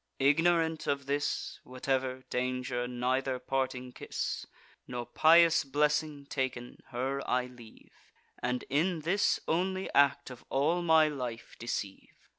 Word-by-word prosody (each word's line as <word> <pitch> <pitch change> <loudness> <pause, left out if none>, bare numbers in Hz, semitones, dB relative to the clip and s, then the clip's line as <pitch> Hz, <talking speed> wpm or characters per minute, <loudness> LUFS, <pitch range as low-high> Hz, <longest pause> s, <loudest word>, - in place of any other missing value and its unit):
Ignorant 160 +3 +2
of 140 -1 0
this 145 +1 -2
(Whatever) 130 0 -2
danger, 125 -1 -1
neither 130 +2 -1
parting 130 -1 -2
kiss, - - -4 0.4
Nor 120 -1 -4
pious 165 +6 +5
blessing 150 +1 0
taken, 130 -3 -4
her 135 +3 -2
I 125 0 +2
leave, 120 -3 -15 0.5
And 125 0 -1
in 160 +4 +1
this 185 +6 +2
only 185 +3 -1
act 140 -1 +3
of 125 - -11
all 155 +6 +1
my 160 -2 +5
life 125 -6 -5
deceive. 105 -4 -4
135 Hz, 120 wpm, -31 LUFS, 125-155 Hz, 0.5 s, pious